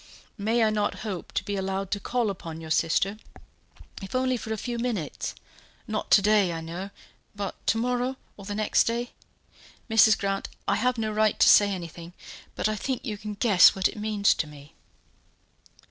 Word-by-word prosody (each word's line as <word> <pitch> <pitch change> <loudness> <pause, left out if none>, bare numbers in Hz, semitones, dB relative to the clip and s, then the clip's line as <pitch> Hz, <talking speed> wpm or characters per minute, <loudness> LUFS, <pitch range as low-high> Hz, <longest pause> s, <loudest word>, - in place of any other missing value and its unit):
May 225 +3 +2
I 215 - +3
not 210 -1 -1
hope 190 -5 -5
to - - -1
be 205 - -3
allowed 195 0 -3
to 205 - 0
call 235 -1 -1
upon 165 -4 -8
your 160 -1 -8
sister, 195 +6 +1 0.8
if 195 +4 -7
only 255 0 +1
for 220 -2 -6
a 220 - -1
few 240 +2 -4
minutes? 230 -10 -3 0.5
not 215 -2 -4
to 200 - +6
day, 205 -3 +4
I 165 - -4
know, 170 +4 -6 0.5
but 200 -1 -4
to 225 - +3
morrow, 250 +2 -1 0.2
or 200 - -12
the 205 0 -4
next 215 0 +2
day? 240 +1 -2 0.8
Mrs. 220 -1 +6
Grant, 195 -1 -2 0.2
I - - +2
have 250 -1 +1
no 220 -1 -1
right 215 0 +2
to - - +6
say 205 -1 +7
anything; 170 -2 -7 0.4
but - - 0
I 215 - -1
think 260 +5 -3
you 215 -5 -3
can 210 0 -7
guess 200 -3 +6
what 190 -1 +2
it - - -8
means 210 -1 +2
to 155 - -3
me." 150 +1 -14
205 Hz, 190 wpm, -26 LUFS, 190-225 Hz, 0.8 s, say